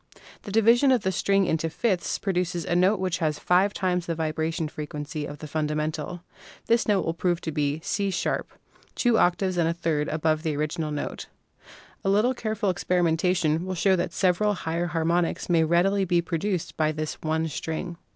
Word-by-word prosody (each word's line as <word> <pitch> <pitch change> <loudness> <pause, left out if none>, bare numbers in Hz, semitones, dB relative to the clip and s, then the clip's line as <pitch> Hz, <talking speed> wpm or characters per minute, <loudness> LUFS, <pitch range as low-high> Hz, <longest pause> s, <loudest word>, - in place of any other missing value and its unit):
The 205 - -8
division 230 +5 +5
of 250 -5 +2
the 190 - +1
string 195 +1 +2
into 165 -1 0
fifths 185 +2 -1
pro 195 - -2
duces 175 -2 -1
a 175 - 0
note 185 +3 +3
which 185 -2 -1
has 155 -3 0
five 185 +3 +3
times 180 -3 -1
the 165 - -1
vibration 160 0 -2
frequency 150 0 -5
of 145 - -8
the 155 - -8
fundamental. 155 +2 -2 0.4
This 230 0 +2
note 205 -3 +2
will 165 - 0
prove 175 0 0
to 160 - -3
be 150 0 -1
C" 200 -1 -1 0.3
# - - -31
— - - -31
two 240 -3 +4
octaves 180 +1 +2
and 165 -1 +2
a - - 0
third 160 -3 -1
above 155 0 0
the 155 -2 -1
original 155 +1 -2
note. 150 -1 -4 0.8
A 195 - +1
little 215 +6 +3
care 220 -3 -3
ful 205 -3 +1
experimentation 175 -2 +1
will 185 0 -3
show 190 +2 +3
that 175 -1 -1
several 195 +4 +2
still - - -9
higher 170 +1 0
harmonics 170 +1 0
may 165 -2 +4
readily 180 +5 +2
be 175 -2 +2
produced 170 +1 -2
by 155 -1 +2
this 155 0 -5
one 160 +1 0
string. 160 +3 -4
170 Hz, 195 wpm, -26 LUFS, 155-190 Hz, 0.8 s, division